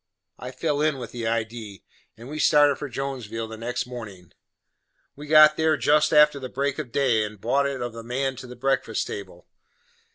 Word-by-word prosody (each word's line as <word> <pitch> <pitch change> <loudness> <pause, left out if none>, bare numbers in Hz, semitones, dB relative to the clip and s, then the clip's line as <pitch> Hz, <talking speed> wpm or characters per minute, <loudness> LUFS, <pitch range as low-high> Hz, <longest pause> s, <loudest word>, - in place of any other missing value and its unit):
I 125 - -7
fell 145 +3 -2
in 155 -2 +1
with 120 -4 -7
the 115 -2 -4
idee, 115 -3 -4 0.3
and 115 +2 -11
we 150 +2 -6
started 145 -2 +4
for 145 - -6
Jonesville 120 -4 -5
the 110 - -8
next 115 +2 -3
mornin'. 110 -8 -10 0.8
We 150 +1 -10
got 155 0 +7
there 160 -1 +2
jest 150 +1 +3
after 150 -2 +5
the 130 -1 -7
break 140 +2 -2
of 135 -6 -6
day, 120 -6 +2
and 105 -1 -7
bought 140 +7 +1
it 135 -3 -4
of 120 -1 -5
the 115 - -8
man 130 +3 -2
to 130 - -9
the 125 - -10
breakfast 135 +2 -1
table. - - -8
130 Hz, 195 wpm, -24 LUFS, 115-145 Hz, 0.8 s, got